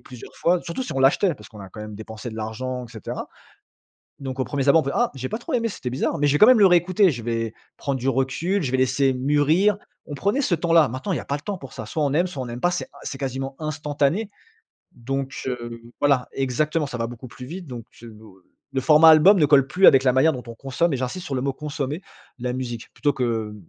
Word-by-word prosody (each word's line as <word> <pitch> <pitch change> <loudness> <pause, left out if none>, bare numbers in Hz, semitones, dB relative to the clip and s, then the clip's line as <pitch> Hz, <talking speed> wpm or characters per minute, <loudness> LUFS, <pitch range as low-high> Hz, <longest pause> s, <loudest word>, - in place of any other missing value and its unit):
plusieurs 125 -3 -12
fois, 175 +1 +1
surtout 170 +10 -4
si 250 - -5
on - - -2
l'achetait, 145 +7 +3
parce 105 - -14
qu'on 105 - -13
a 95 - -9
quand 105 - -11
même 105 0 -7
dépensé 110 +2 -8
de - - -9
l'argent, 125 +4 -4
et 115 - -14
cetera. 110 -3 -6 0.9
Donc, 135 -1 -6
aux 130 - +2
1ers 140 0 -1
abords, 160 +3 +6
on - - -14
fait: 140 - -1
«Ah, 240 0 +2
j'ai 130 -1 -4
pas 220 - -3
trop - - -6
aimé, 230 -2 +1
c'était 130 - -5
bizarre. 135 +5 -2
Mais 145 - +3
j'ai 145 +1 +3
quand - - +8
même 250 -1 +6
le 200 - +8
réécouter. 185 +2 +4
Je 120 -7 -4
vais 115 -1 -2 0.2
prendre 140 -2 -2
du 130 - -3
recul, 135 +9 0
je 135 - -2
vais 130 - +1
laisser 130 +1 +2
mûrir». 150 +9 +2 0.3
On - - -8
prenait 200 - 0
ce 225 - 0
temps-là. 165 -2 +4
Maintenant, 130 - -4
il - - 0
y - - -3
a - - -8
pas 140 - -2
le 145 - -7
temps 200 +5 -4
pour 135 -7 -11
ça, 110 - -7
soit 155 +7 -2
on 140 - 0
aime, 175 +4 +2
soit 140 -8 -5
on - - -6
n'aime 120 0 -6
pas. 175 - +3
C'est 180 - -2
in - - -15
c'est 135 - -5
quasiment 135 0 -4
instantané. 155 +5 -1 0.6
Donc, 135 +2 -4
heu, 120 -2 -5 0.2
voilà 140 -3 +2
exactement, 150 +4 0
ça 125 -3 -6
va 115 - -1
beaucoup 120 +1 -10
plus 125 +1 -10
vite. 175 +5 -8
Donc, 120 -4 -8 0.2
heu, 115 -2 -10 0.6
le 135 - 0
format 155 +3 +7
album 175 +6 +7
ne 150 - +4
colle 140 -2 +5
plus 180 +7 +3
avec 135 - +7
la 125 - +4
manière 135 +5 +4
dont 125 -3 -6
on 115 - -7
consomme 135 +7 -1
et - - +1
j'insiste 130 +9 -4
sur 140 - -4
le - - -1
mot 135 0 0
consommer 145 +3 -4 0.4
la 125 0 -3
musique, 120 -2 -6
plutôt 145 -1 +1
que 115 -4 -2
135 Hz, 260 wpm, -23 LUFS, 125-165 Hz, 0.9 s, quand